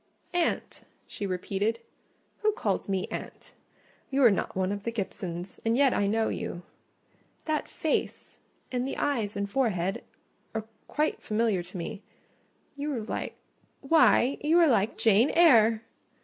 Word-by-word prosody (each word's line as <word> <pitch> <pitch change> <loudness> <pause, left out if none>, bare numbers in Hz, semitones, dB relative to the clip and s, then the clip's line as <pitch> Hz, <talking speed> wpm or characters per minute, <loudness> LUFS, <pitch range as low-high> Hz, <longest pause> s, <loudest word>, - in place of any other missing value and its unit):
"Aunt," 350 -1 -1 0.2
she 200 - -5
repeated. 200 +4 -1 0.6
"Who 430 0 +2
calls 430 - -2
me 190 -1 0
aunt? - - -7 0.6
You 275 0 +2
are 235 - +8
not 195 - -2
one 190 0 0
of 205 0 -3
the 230 - -3
Gibsons; 185 -4 -5
and 230 +1 +2
yet 275 -1 +4
I 200 - +1
know 220 +2 +1
you—that 300 - -7
face, 315 - -2 0.3
and 250 0 -1
the - - -4
eyes 225 -8 -1
and 200 0 -1
forehead, 200 -5 0 0.5
are 220 -1 -2 0.2
quiet 305 +1 -1
familiar 215 -3 +1
to 180 +2 -9
me: 195 +4 -5 0.7
you 290 +1 -3
are 230 - -2
like—why, 270 +4 +1
you 315 +3 +3
are 345 - +7
like 225 -5 +2
Jane 225 +4 +4
Eyre!" 230 -10 +6
225 Hz, 140 wpm, -28 LUFS, 200-275 Hz, 0.7 s, are